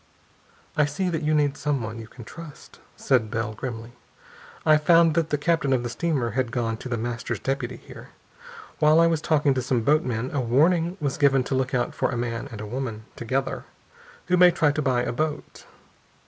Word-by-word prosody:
"I 150 - +4
see 180 +6 -2
that 165 -2 -2
you 155 0 +1
need 145 -2 +2
someone 115 -6 -2
you 110 - -9
can 120 +1 -12
trust," 160 +5 -12 0.2
said 120 -5 +1
Bell 115 0 -2
grimly. 115 0 -6 0.7
"I 155 -1 +6
found 165 +1 +5
that 165 -1 0
the 150 - +1
captain 145 -2 +1
of 125 -2 +1
the 120 - -3
steamer 135 -3 -1
had 130 -3 -1
gone 115 -2 -1
to 130 - -8
The 120 - -1
Master's 120 +2 -3
deputy 135 -2 -3
here. - - -13 0.7
While 155 0 +5
I 165 - +6
was 165 -2 +1
talking 150 -4 +2
to 130 - -1
some 125 -2 0
boatmen 130 -4 +1
a 140 - 0
warning 165 +9 +2
was 145 -1 -2
given 135 -2 +4
to 135 - -4
look 130 0 0
out 120 -1 0
for - - 0
a 120 - -3
man 115 -1 -3
and 105 -1 -7
woman, 120 -4 -4
together, 130 +3 -2 0.6
who 180 - +2
may 180 0 +8
try 155 -4 +2
to 150 - -2
buy 130 -3 +1
a - - -2
boat. 150 +4 -4
135 Hz, 200 wpm, -25 LUFS, 120-155 Hz, 0.7 s, may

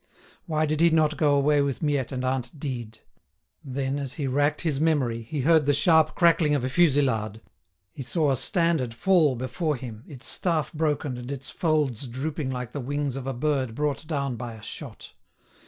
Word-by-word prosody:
Why 155 -1 +1
did 155 +1 -1
he 170 - +6
not 155 -1 +2
go 145 -2 +3
away 145 +1 +3
with 140 +1 -2
Miette 145 -4 0
and 130 -1 -3
aunt 130 +1 -2
Dide? 120 -6 -5 0.7
Then 135 +1 -2
as 135 -3 -4
he 145 - -3
racked 145 +3 +1
his 150 -5 -1
memory, 135 -8 +1
he 135 +6 -4
heard 155 +1 +4
the 145 - +4
sharp 160 +1 +4
crackling 165 -3 +4
of 135 - -1
a 130 - -1
fusillade; 130 - +2 0.5
he - - -8
saw 145 +3 +1
a - - +2
standard 145 - +1
fall 160 -2 +3
before 135 +6 -2
him, 120 -3 -8
its 130 -4 -11
staff 165 -4 0
broken 150 -4 -1
and 125 +2 -7
its 135 -1 -6
folds 150 -7 0
drooping 140 +3 -3
like 125 -3 -4
the 145 - -5
wings 145 +1 -2
of 135 -1 -5
a 135 - -1
bird 130 -3 -1
brought 150 +1 -2
down 140 -5 -2
by 120 0 -6
a 110 -2 -12
shot. - - -8
140 Hz, 190 wpm, -26 LUFS, 130-155 Hz, 0.7 s, he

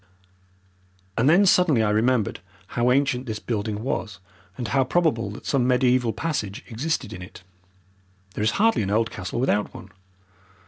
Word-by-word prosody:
And 120 +5 +3
then 185 +5 +5
suddenly 170 -11 +4
I 105 - +1
remembered 110 0 +1 0.3
how 120 +1 +1
ancient 135 -1 +1
this 110 -1 -3
building 110 -1 -3
was, 110 -5 -3 0.4
and 120 -3 -4
how 135 -1 +3
probable 130 - +1
that 105 - -10
some 130 -3 +1
mediaeval 125 -2 +2
passage 125 -12 -3
existed 125 -2 -3
in 90 - -8
it. 90 0 -11 0.9
There 105 - -3
is 110 - +3
hardly 225 - +3
an 95 - -2
old 110 +2 +1
castle 90 +6 -5
without 105 -5 0
one. - - -11
120 Hz, 155 wpm, -24 LUFS, 105-135 Hz, 0.9 s, then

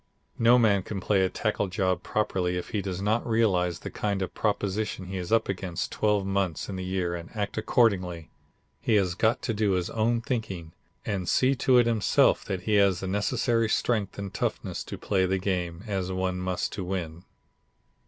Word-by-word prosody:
No 120 +2 +6
man 105 -5 +4
can 100 +1 -5
play 95 +1 +2
a 95 - +2
tackle 105 -1 -1
job 90 -1 0
properly 90 -4 -1
if 90 - -5
he 105 - -1
does 95 -1 -4
not 110 +3 +1
realize 95 -7 +1
the - - -6
kind 100 -2 -1
of 95 - -3
a - - -45
proposition 105 -2 -1
he 95 +1 -5
is 90 +1 -5
up 115 -1 +3
against 90 -3 -3
twelve 105 -2 +1
months 95 -4 -1
in 100 - -5
the 95 - -4
year 90 -2 -1
and 85 -1 -6
act 105 -1 -2
accordingly. 95 -7 +1 0.5
He 110 - +1
has 95 -4 +2
got 110 +6 +1
to 115 - -1
do 105 -2 +1
his 90 -1 -1
own 115 +1 +1
thinking, 100 -10 -4 0.3
and 95 -4 -2
see 130 +1 +3
to 130 0 +4
it 120 - +5
himself 115 -3 +3
that 95 -2 -3
he 105 +2 +2
has 100 -3 +3
the 95 - -3
necessary 115 +3 +1
strength 110 -3 0
and 100 -1 -5
toughness, - - -2
to - - -6
play 95 -2 +1
the 95 +1 +1
game, 90 -2 -2
as 95 -3 -2
one 95 0 -1
must 90 -1 -2
to 95 - -4
win." 90 -2 -4
95 Hz, 200 wpm, -27 LUFS, 90-110 Hz, 0.5 s, No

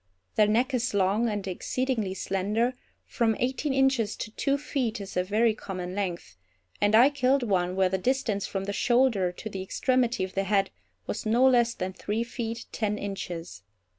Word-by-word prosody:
Their 210 - +4
neck 240 +6 +2
is 245 -3 0
long, 200 +4 +2
and 205 -2 -3
exceedingly 220 +1 -2
slender, 210 +7 0 0.3
from 225 -2 +1
eighteen 260 +4 -1
inches 265 -5 +2
to 215 - -6
two 275 +5 0
feet 260 -6 -2
is 195 -1 -8
a 180 - +2
very 215 +4 +2
common 185 -4 -6
length, 175 - -4 0.4
and 205 +1 +4
I 250 +6 +7
killed 275 -1 +2
one, 185 -5 0
where 190 -1 +3
the 190 0 -1
distance 230 -3 0
from 195 -1 -3
the 200 +1 -3
shoulder 235 -6 +2
to 220 - -8
the 195 -3 -5
extremity 245 +3 +1
of 185 - -5
the 195 0 -1
head 195 -1 +1 0.3
was - - -4
no 240 +4 +4
less 240 -2 +3
than 185 +1 -4
three 210 +4 -2
feet 230 -1 -5
ten 210 -2 -1
inches. 175 - -6
215 Hz, 180 wpm, -27 LUFS, 195-245 Hz, 0.4 s, I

